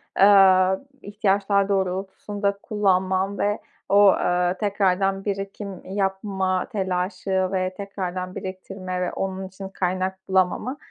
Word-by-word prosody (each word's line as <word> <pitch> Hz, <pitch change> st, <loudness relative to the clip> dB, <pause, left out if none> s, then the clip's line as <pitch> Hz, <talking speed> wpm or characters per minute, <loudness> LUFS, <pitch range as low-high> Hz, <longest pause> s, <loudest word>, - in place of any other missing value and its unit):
aaa, 190 Hz, -1 st, +6 dB, 0.3 s
ihtiyaçlar 200 Hz, -1 st, +1 dB
doğrultusunda 200 Hz, +1 st, -1 dB
kullanman 190 Hz, -1 st, +1 dB
ve 205 Hz, +1 st, +1 dB, 0.3 s
o, 200 Hz, 0 st, +7 dB
ııı, 180 Hz, +1 st, +1 dB
tekrardan 195 Hz, -1 st, +1 dB
birikim 195 Hz, -1 st, -4 dB
yapma 190 Hz, -1 st, -1 dB
telaşı 190 Hz, -1 st, -1 dB
ve 185 Hz, -1 st, -1 dB
tekrardan 185 Hz, -2 st, -5 dB
biriktirme 185 Hz, -1 st, -5 dB
ve 180 Hz, -, -2 dB
onun 190 Hz, 0 st, -3 dB
için 190 Hz, +1 st, -9 dB
kaynak 185 Hz, 0 st, -2 dB
bulamama 190 Hz, +8 st, +1 dB
190 Hz, 105 wpm, -24 LUFS, 185-200 Hz, 0.3 s, o